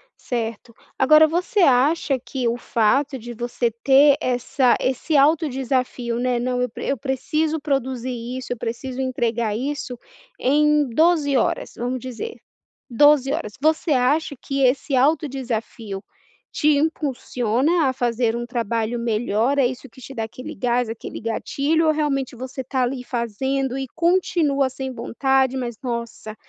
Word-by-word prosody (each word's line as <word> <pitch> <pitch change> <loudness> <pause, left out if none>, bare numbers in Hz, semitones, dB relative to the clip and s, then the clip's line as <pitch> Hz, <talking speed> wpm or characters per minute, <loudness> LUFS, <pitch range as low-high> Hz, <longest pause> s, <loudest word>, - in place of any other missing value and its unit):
certo. 230 -1 -4 0.3
Agora 305 +4 +7
você 360 +5 0
acha 275 0 +3
que 250 0 -3
o 235 - +1
fato 265 +4 +1
de 240 0 -8
você 240 0 -2
ter 280 +1 +6
essa 250 +1 +2
esse 275 +4 0
alto 305 +2 +4
desafio, 250 -2 -2
né: 245 -1 0
"Não, 250 0 -1
eu 250 - 0
eu 275 - -2
preciso 300 +5 -1
produzir 260 -3 -2
isso, 245 +1 -5
eu - - -9
preciso 250 +4 -4
entregar 235 -4 -1
isso 265 -1 -4 0.4
em 300 +1 +3
12 310 +1 +3
horas". 250 - 0
Vamos 245 +2 -3
dizer, 260 - -6 0.5
12 285 +2 +4
horas. 210 -10 -4
Você 310 +1 +2
acha 285 +4 +2
que 275 -1 -2
esse 265 +2 +1
auto 300 +4 +3
desafio 230 -6 -5 0.5
te 300 - 0
impulsiona 280 0 0
a 260 - +1
fazer 235 -2 0
um 240 0 -3
trabalho 230 -1 -2
melhor? 235 +3 0
É 265 - +4
isso 255 0 -6
que 260 - -16
te 270 +2 -10
dá 225 - -3
aquele 250 +3 -8
gás? 245 +2 0
Aquele 225 0 -7
gatilho? 280 +8 0
Ou 310 - +4
realmente 275 -4 -1
você 260 +1 -6
tá 260 0 -1
ali, 250 0 -2
fazendo 260 +3 -2
e 270 -1 -3
continua 325 -6 +2
sem 265 0 -5
vontade: 265 +2 +1
"Mas 240 -3 -4
nossa! 235 -3 -5
260 Hz, 150 wpm, -22 LUFS, 240-285 Hz, 0.5 s, Agora